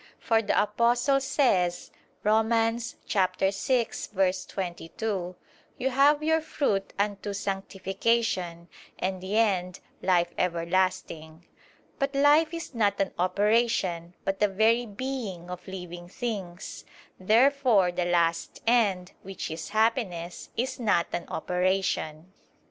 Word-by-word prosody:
For 225 Hz, -2 st, +2 dB
the 205 Hz, -, +1 dB
Apostle 240 Hz, +6 st, +2 dB
says 195 Hz, -, +1 dB, 0.3 s
(Rom. 220 Hz, +1 st, +3 dB
6:22): 195 Hz, -, -1 dB, 0.4 s
"You 265 Hz, -, 0 dB
have 290 Hz, +3 st, +4 dB
your 320 Hz, +1 st, +2 dB
fruit 215 Hz, -11 st, -1 dB
unto 205 Hz, 0 st, -1 dB
sanctification, 195 Hz, -2 st, -1 dB, 0.3 s
and 185 Hz, 0 st, -2 dB
the 195 Hz, +3 st, -2 dB
end, 185 Hz, -5 st, +1 dB, 0.2 s
life 175 Hz, -2 st, +2 dB
everlasting." 170 Hz, -2 st, -1 dB, 0.5 s
But 275 Hz, 0 st, -1 dB
life 295 Hz, +3 st, +5 dB
is 335 Hz, -3 st, -6 dB
not 205 Hz, -4 st, +1 dB
an 195 Hz, -1 st, 0 dB
operation, 185 Hz, -3 st, +1 dB
but 195 Hz, 0 st, -1 dB
the 210 Hz, -, +4 dB
very 225 Hz, +4 st, +2 dB
being 205 Hz, -6 st, -5 dB
of 180 Hz, +1 st, -8 dB
living 175 Hz, -2 st, -8 dB
things. 195 Hz, -6 st, -5 dB, 0.4 s
Therefore 230 Hz, -1 st, +4 dB
the 175 Hz, 0 st, -1 dB
last 170 Hz, -1 st, 0 dB
end, 205 Hz, -6 st, +2 dB
which 195 Hz, -4 st, -6 dB
is 160 Hz, +1 st, -6 dB
happiness, 210 Hz, -6 st, -1 dB
is 255 Hz, +3 st, -2 dB
not 205 Hz, -8 st, +2 dB
an 175 Hz, -, -3 dB
operation. 180 Hz, -2 st, -1 dB
195 Hz, 110 wpm, -27 LUFS, 180-230 Hz, 0.5 s, life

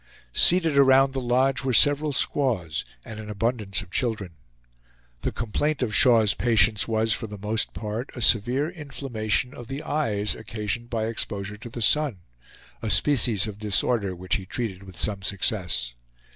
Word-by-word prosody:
Seated 165 Hz, -, +4 dB
around 135 Hz, 0 st, +4 dB
the 135 Hz, -, -3 dB
lodge 130 Hz, +2 st, +1 dB
were 130 Hz, -2 st, +1 dB
several 145 Hz, +3 st, +5 dB
squaws, 115 Hz, -, -1 dB, 0.2 s
and 110 Hz, -1 st, -9 dB
an 105 Hz, -1 st, -9 dB
abundance 105 Hz, -2 st, -2 dB
of 90 Hz, -, -19 dB
children. 110 Hz, -7 st, -2 dB, 0.9 s
The -, -, -2 dB
complaint 135 Hz, +6 st, -2 dB
of 110 Hz, -3 st, -3 dB
Shaw's 110 Hz, -1 st, +5 dB
patients 110 Hz, -2 st, +3 dB
was, 110 Hz, 0 st, +1 dB
for 110 Hz, -, -4 dB
the 105 Hz, 0 st, -9 dB
most 105 Hz, +3 st, -2 dB
part, 110 Hz, +4 st, -5 dB
a 120 Hz, -, -7 dB
severe 120 Hz, +7 st, +3 dB
inflammation 135 Hz, -, -3 dB
of 120 Hz, -, -11 dB
the 135 Hz, +4 st, -6 dB
eyes, 105 Hz, -9 st, -1 dB
occasioned 110 Hz, +2 st, -5 dB
by 115 Hz, -2 st, -2 dB
exposure 105 Hz, -2 st, -3 dB
to 115 Hz, +3 st, -10 dB
the 120 Hz, 0 st, -4 dB
sun, 140 Hz, -, +2 dB, 0.6 s
a 110 Hz, -, -3 dB
species 120 Hz, -7 st, +3 dB
of 105 Hz, -2 st, -8 dB
disorder 105 Hz, -1 st, 0 dB
which 90 Hz, +1 st, -2 dB
he 95 Hz, -, -10 dB
treated 100 Hz, -3 st, -4 dB
with 95 Hz, -3 st, -12 dB
some 100 Hz, -2 st, 0 dB
success. 90 Hz, -, -1 dB
110 Hz, 160 wpm, -24 LUFS, 105-130 Hz, 0.9 s, several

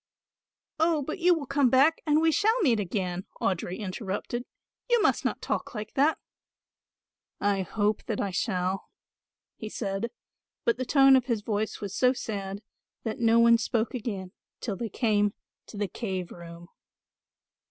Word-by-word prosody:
"Oh, 320 Hz, -2 st, +2 dB
but 310 Hz, +7 st, -5 dB
you 355 Hz, 0 st, +5 dB
will 305 Hz, -4 st, -4 dB
come 275 Hz, -1 st, +3 dB
back 275 Hz, +6 st, +4 dB
and 300 Hz, 0 st, +4 dB
we 325 Hz, 0 st, +4 dB
shall 435 Hz, +8 st, +3 dB
meet 245 Hz, -, +3 dB
again," 185 Hz, -2 st, -2 dB
Audry 185 Hz, -1 st, -1 dB
interrupted, 210 Hz, +4 st, -4 dB, 0.4 s
"you 480 Hz, -1 st, +4 dB
must -, -, +2 dB
not -, -, -2 dB
talk -, -, -3 dB
like 210 Hz, 0 st, -5 dB
that." 290 Hz, +4 st, +3 dB, 1.2 s
"I 200 Hz, -1 st, +1 dB
hope 205 Hz, +3 st, -1 dB
that 220 Hz, -, -2 dB
I 200 Hz, -, -1 dB
shall," 185 Hz, -1 st, -1 dB, 0.7 s
he 215 Hz, -, -6 dB
said, 200 Hz, +1 st, -3 dB, 0.6 s
but 465 Hz, -, +2 dB
the 255 Hz, -, -2 dB
tone 270 Hz, 0 st, +6 dB
of 255 Hz, -2 st, +3 dB
his 230 Hz, -5 st, -1 dB
voice 215 Hz, 0 st, -2 dB
was 200 Hz, -1 st, -5 dB
so 250 Hz, 0 st, +4 dB
sad 200 Hz, -4 st, -5 dB, 0.4 s
that 220 Hz, -2 st, -3 dB
no 230 Hz, -1 st, +4 dB
one 235 Hz, 0 st, +6 dB
spoke 225 Hz, 0 st, -1 dB
again 205 Hz, -7 st, -4 dB, 0.3 s
till 210 Hz, -5 st, -3 dB
they 225 Hz, +3 st, -4 dB
came 205 Hz, -2 st, +1 dB, 0.3 s
to 210 Hz, -, -10 dB
the 205 Hz, 0 st, 0 dB
cave 190 Hz, -3 st, -4 dB
room. 170 Hz, 0 st, -11 dB
220 Hz, 160 wpm, -28 LUFS, 195-265 Hz, 1.2 s, tone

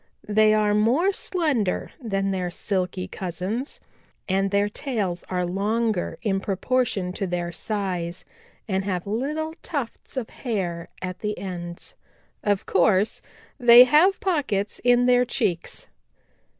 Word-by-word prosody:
They 215 Hz, +1 st, +4 dB
are 210 Hz, -1 st, +2 dB
more 250 Hz, -, +3 dB
slender 295 Hz, -, -1 dB
than 195 Hz, -4 st, -1 dB
their 185 Hz, -2 st, -1 dB
Silky 185 Hz, 0 st, -2 dB
cousins, 190 Hz, -, -4 dB, 0.5 s
and 195 Hz, +1 st, +1 dB
their 200 Hz, +1 st, +2 dB
tails 205 Hz, -7 st, -3 dB
are 180 Hz, -1 st, 0 dB
longer 210 Hz, +2 st, -1 dB
in 195 Hz, -4 st, +1 dB
proportion 195 Hz, -1 st, 0 dB
to 195 Hz, -, -3 dB
their 175 Hz, -1 st, -2 dB
size 180 Hz, -3 st, -3 dB, 0.4 s
and 190 Hz, -2 st, 0 dB
have 185 Hz, -3 st, -2 dB
little 295 Hz, +9 st, -2 dB
tufts 275 Hz, -3 st, -5 dB
of 240 Hz, -4 st, -3 dB
hair 180 Hz, -9 st, -3 dB
at 185 Hz, 0 st, -4 dB
the 210 Hz, -1 st, -3 dB
ends. 175 Hz, -2 st, -6 dB, 0.5 s
Of 205 Hz, -2 st, +1 dB
course, 190 Hz, +2 st, +2 dB, 0.4 s
they 240 Hz, 0 st, +10 dB
have 310 Hz, +10 st, +4 dB
pockets 270 Hz, -, -1 dB
in 245 Hz, 0 st, +4 dB
their 250 Hz, 0 st, +5 dB
cheeks. 210 Hz, -9 st, -2 dB
205 Hz, 125 wpm, -24 LUFS, 185-245 Hz, 0.5 s, they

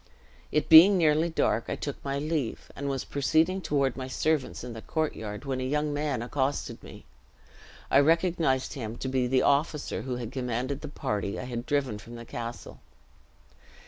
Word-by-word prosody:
It 150 Hz, -, +1 dB
being 175 Hz, +5 st, +9 dB
nearly 160 Hz, 0 st, +3 dB
dark, 115 Hz, -7 st, +1 dB
I -, -, -2 dB
took 145 Hz, -, -6 dB
my 140 Hz, 0 st, -2 dB
leave, 150 Hz, -4 st, -3 dB
and 140 Hz, 0 st, -3 dB
was 135 Hz, -2 st, -2 dB
proceeding 160 Hz, +6 st, +1 dB
toward 140 Hz, -6 st, 0 dB
my 130 Hz, -1 st, -5 dB
servants 150 Hz, 0 st, -1 dB
in 125 Hz, -1 st, -6 dB
the 115 Hz, -, -8 dB
courtyard 110 Hz, -8 st, -3 dB
when 130 Hz, -2 st, -2 dB
a -, -, -2 dB
young 150 Hz, +3 st, 0 dB
man 145 Hz, -5 st, -1 dB
accosted 135 Hz, +3 st, -2 dB
me. -, -, -12 dB, 0.9 s
I 135 Hz, -, +7 dB
recognized 165 Hz, -3 st, +2 dB
him 115 Hz, -3 st, -5 dB
to -, -, -4 dB
be 130 Hz, -1 st, +1 dB
the 130 Hz, +1 st, +2 dB
officer 145 Hz, +2 st, +1 dB
who 130 Hz, -2 st, -3 dB
had 120 Hz, -2 st, -5 dB
commanded 130 Hz, +2 st, -3 dB
the 150 Hz, -, -6 dB
party 105 Hz, -8 st, -3 dB
I -, -, -4 dB
had 120 Hz, -1 st, -5 dB
driven 135 Hz, -7 st, 0 dB
from 115 Hz, +3 st, -11 dB
the 120 Hz, 0 st, -9 dB
castle. 115 Hz, +1 st, -7 dB
135 Hz, 175 wpm, -28 LUFS, 125-150 Hz, 0.9 s, being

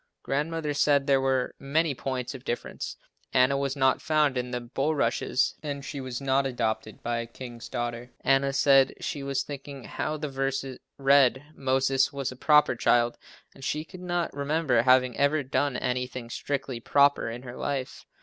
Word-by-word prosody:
Grandmother 150 Hz, +2 st, -1 dB
said 145 Hz, -1 st, +3 dB
there 135 Hz, -2 st, +3 dB
were 130 Hz, -1 st, 0 dB
many 150 Hz, +2 st, +1 dB
points 130 Hz, 0 st, -4 dB
of 130 Hz, -2 st, -9 dB
difference. 120 Hz, -, -4 dB, 0.4 s
Anna 130 Hz, +2 st, +4 dB
was 140 Hz, 0 st, -1 dB
not 130 Hz, -1 st, +2 dB
found 150 Hz, -3 st, +2 dB
in 125 Hz, 0 st, -2 dB
the 125 Hz, 0 st, -2 dB
bulrushes 130 Hz, 0 st, 0 dB
and 145 Hz, -2 st, -5 dB
she 140 Hz, +1 st, -5 dB
was 130 Hz, -2 st, -5 dB
not 135 Hz, 0 st, +1 dB
adopted 110 Hz, -4 st, -3 dB
by 120 Hz, 0 st, -1 dB
a 115 Hz, -, -4 dB
king's 120 Hz, -1 st, -9 dB
daughter. 120 Hz, 0 st, -4 dB
Anna 135 Hz, 0 st, +3 dB
said 135 Hz, 0 st, +4 dB
she 145 Hz, -, -4 dB
was 135 Hz, 0 st, -1 dB
thinking 140 Hz, -2 st, -8 dB
how 155 Hz, -, -3 dB
the 150 Hz, 0 st, -3 dB
verse 135 Hz, 0 st, -2 dB, 0.3 s
read, 135 Hz, -1 st, +4 dB
"Moses 135 Hz, 0 st, +1 dB
was 140 Hz, -2 st, -3 dB
a -, -, -9 dB
proper 150 Hz, 0 st, +4 dB
child," 120 Hz, 0 st, +2 dB, 0.3 s
and 135 Hz, -, -14 dB
she 150 Hz, +3 st, -2 dB
could 185 Hz, +2 st, -12 dB
not 175 Hz, -1 st, -2 dB
remember 140 Hz, -3 st, +1 dB
having 130 Hz, 0 st, +4 dB
ever 140 Hz, +1 st, +3 dB
done 135 Hz, 0 st, 0 dB
anything 125 Hz, -1 st, -3 dB
strictly 135 Hz, -3 st, -3 dB
"proper" 140 Hz, 0 st, +3 dB
in 120 Hz, +2 st, -7 dB
her 125 Hz, -1 st, -8 dB
life. 135 Hz, -2 st, -4 dB
135 Hz, 170 wpm, -27 LUFS, 125-140 Hz, 0.4 s, Anna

